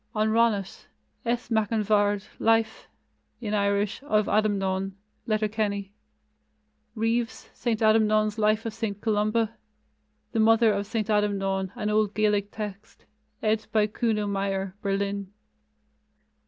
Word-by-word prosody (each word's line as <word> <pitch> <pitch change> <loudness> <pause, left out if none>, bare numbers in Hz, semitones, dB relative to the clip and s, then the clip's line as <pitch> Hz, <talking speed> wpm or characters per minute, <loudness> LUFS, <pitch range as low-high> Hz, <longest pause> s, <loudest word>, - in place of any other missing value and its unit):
On 215 0 +2
Ronnat: 220 -4 +1 0.4
S. 240 0 -2
Mac 220 -2 +1
an 220 -2 +1
Bhaird, 205 -1 +2 0.2
Life 225 -1 +1 0.5
(in 215 -3 -4
Irish) 200 +1 0
of 215 -7 +1
Adamnan 195 -2 0 0.3
(Letterkenny); 210 -2 -1 1.0
Reeves, 230 +2 -1
St. 230 -3 -1
Adamnan's 215 -1 +3
Life 215 +1 +2
of 225 - -3
St. 215 -3 -3
Columba; 215 +1 +1 0.8
The 230 - -1
Mother 225 0 +5
of 200 0 -2
St. 215 -1 -2
Adamnan, 195 -3 0
an 210 0 -2
old 210 -1 +1
Gaelic 210 -1 +1
text, 210 -1 -8 0.4
ed. 215 0 +1
by 215 -1 +3
Kuno 215 0 -1
Meyer 195 -1 -2
(Berlin). 200 -1 -2
215 Hz, 120 wpm, -26 LUFS, 200-220 Hz, 1.0 s, Mother